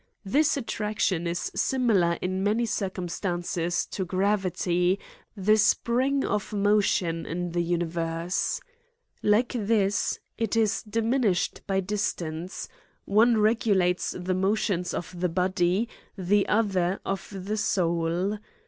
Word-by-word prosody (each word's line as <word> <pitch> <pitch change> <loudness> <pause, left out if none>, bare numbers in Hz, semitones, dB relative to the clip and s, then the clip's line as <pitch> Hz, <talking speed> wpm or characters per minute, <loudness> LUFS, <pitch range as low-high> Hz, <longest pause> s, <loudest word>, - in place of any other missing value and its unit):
This 290 +9 +2
attraction 210 -7 -1
is 170 0 -2
siniilar 210 -10 +2
in 185 +1 -1
many 215 +4 +2
cir 200 -3 -1
cumstances 175 -1 -2
to 190 - -2
gravity, 185 -1 +1 0.4
the 215 +3 +4
spring 255 +5 +2
of 210 0 -2
motion 200 -5 +1
in 175 +1 -3
the 175 +1 0
universe. 170 0 -1 0.6
Like 215 +4 +3
this, 205 -3 +1 0.2
it 225 -2 0
is 220 -2 +2
diminished 225 -3 0
by 195 -1 +1
distance; 180 -3 -3 0.4
one 225 +3 +4
regulates 210 -5 +2
the 180 +1 -2
motions 190 -1 0
of 175 0 -6
the 180 0 +1
body, 185 +4 +1 0.3
the 195 +2 +2
other 195 -4 +1
of 195 0 -3
the 200 +2 -4
soul. 175 +1 0
195 Hz, 115 wpm, -27 LUFS, 175-215 Hz, 0.6 s, the